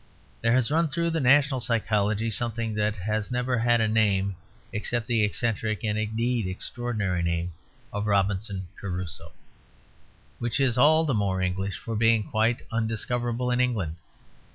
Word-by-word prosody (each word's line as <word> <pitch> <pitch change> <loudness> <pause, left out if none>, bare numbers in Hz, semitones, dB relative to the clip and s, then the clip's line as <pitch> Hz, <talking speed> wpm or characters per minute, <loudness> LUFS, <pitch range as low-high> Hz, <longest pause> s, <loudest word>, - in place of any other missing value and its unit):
There 115 0 +3
has 130 0 +2
run 165 +2 +3
through 170 +2 -1
the 165 - 0
national 135 0 +4
psychology 110 -2 0
something 115 0 0
that 105 0 0
has 105 +2 -2
never 125 0 0
had 120 0 +3
a 110 - +2
name 100 -3 +2 0.4
except 110 +2 -1
the 115 -3 +1
eccentric 110 -2 -1
and 105 -1 0
indeed 110 +1 -1
extraordinary 100 -1 -2
name 85 0 -1 0.4
of 105 +1 -2
Robinson 100 -1 0
Crusoe; 90 -5 -5 1.1
which 120 +4 -1
is 130 -4 +3
all 155 +5 +5
the 145 - 0
more 100 -4 0
English 95 +1 -2
for 115 -2 -5
being 115 0 +3
quite 110 +3 0
undiscoverable 120 +2 -1
in 125 - +1
England. 105 -11 0
110 Hz, 150 wpm, -26 LUFS, 100-120 Hz, 1.1 s, all